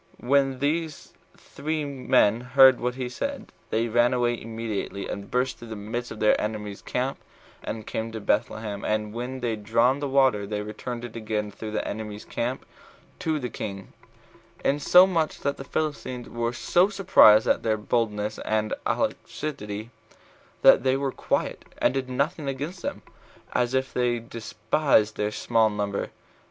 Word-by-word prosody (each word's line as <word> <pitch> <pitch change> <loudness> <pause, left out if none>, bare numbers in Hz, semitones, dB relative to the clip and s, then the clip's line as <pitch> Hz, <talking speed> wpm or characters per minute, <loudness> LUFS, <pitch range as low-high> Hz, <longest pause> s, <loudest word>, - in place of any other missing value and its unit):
When 135 +1 +2
these 155 +3 -2 0.2
three 155 0 -4
men 125 -5 +2
heard 130 +1 +6
what 125 +1 -1
he 130 -1 -3
said, 280 - -5 0.2
they 115 +1 +1
ran 120 +2 +3
away 120 -1 0
immediately, 110 -3 -4
and 100 0 -6
burst 125 +1 0
through 120 - -10
the 110 - -6
midst 115 +4 -4
of - - -8
their 105 - +3
enemy's 105 -2 -4
camp, 130 +2 -2 0.4
and 110 -1 -5
came 115 +1 -3
to 110 - -4
Bethlehem; 105 0 -1
and 105 0 -1
when 125 +2 -5
they 120 -1 0
had 110 -2 -5
drawn 115 +5 +3
the 145 - -2
water, 130 -7 +3
they 105 0 -3
returned 120 +3 -6
again 110 -2 -3
through 110 +2 -7
the 105 - -2
enemy's 105 0 -6
camp 120 +3 -3 0.5
to 160 -1 0
the 125 -4 -4
king, 100 -2 -6 0.7
insomuch 165 +3 +4
that 140 0 -1
the - - -6
Philistines 135 -5 -3
were 120 0 -2
so 175 +9 +2
surprised 180 - +6
at - - +2
their 110 -1 +1
boldness 105 -1 -1
and 110 0 -1
alacrity, 110 -6 -3 0.7
that - - +8
they 130 +1 +2
were 135 -1 -1
quiet, - - -2
and - - +2
did 135 -1 -2
nothing 140 +3 -1
against 145 +7 -4
them, - - -4 0.5
as 125 +1 +1
if 130 0 -1
they 125 -1 +1
despised 115 0 0
their 105 - 0
small 115 0 +2
number. 105 -1 -2
120 Hz, 160 wpm, -26 LUFS, 110-135 Hz, 0.7 s, that